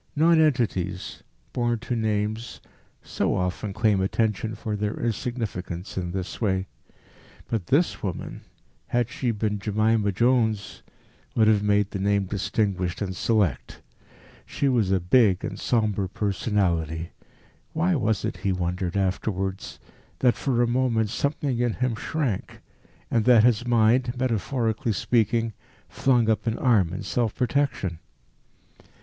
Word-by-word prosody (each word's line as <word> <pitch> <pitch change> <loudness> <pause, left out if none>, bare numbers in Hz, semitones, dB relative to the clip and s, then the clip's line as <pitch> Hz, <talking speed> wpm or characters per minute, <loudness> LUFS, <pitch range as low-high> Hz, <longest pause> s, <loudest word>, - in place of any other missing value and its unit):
Nonentities, 135 - +1 0.3
born 120 -1 0
to 120 +2 -4
names, 110 +1 -2 0.4
so - - -1
often 90 +3 -2
claim 105 -1 +2
attention 110 +2 0
for 105 0 -4
their 105 +1 -2
insignificance 105 -6 -3
in 90 -2 -2
this 95 +4 -5
way. 95 -3 +1 0.9
But 110 -7 -2
this 160 +6 +2
woman, 95 -4 -5 0.5
had 120 -1 0
she 140 -4 -2
been 105 -2 -1
Jemima 105 +1 +1
Jones, 110 -2 +1 0.5
would 110 -1 +4
have 105 -2 +4
made 105 -1 +2
the 100 - -4
name 100 0 +1
distinguished 95 -2 -1
and 95 -2 -4
select. 95 - 0 0.6
She 140 - -2
was 120 -7 +2
a 95 -1 +2
big 95 +1 +3
and - - -5
sombre 105 -5 0
personality. 90 -6 -1 0.6
Why 175 +3 +1
was 110 - 0
it, - - -3
he 100 - -1
wondered 90 0 -2
afterwards, 95 0 -2 0.4
that 125 -2 +3
for 120 -3 0
a - - +2
moment 120 -3 +1
something 140 -2 -1
in 120 -2 +1
him 125 +1 -1
shrank, 125 -1 -3 0.5
and 115 - +2
that 120 -4 +6
his 120 0 +3
mind, 120 +2 +3
metaphorically 115 -2 0
speaking, 115 +1 +1 0.3
flung 125 -5 +2
up 110 +1 0
an 115 - 0
arm 105 -10 +3
in 95 - -5
self 115 -3 -1
protection? 125 - -1
110 Hz, 130 wpm, -25 LUFS, 95-120 Hz, 0.9 s, that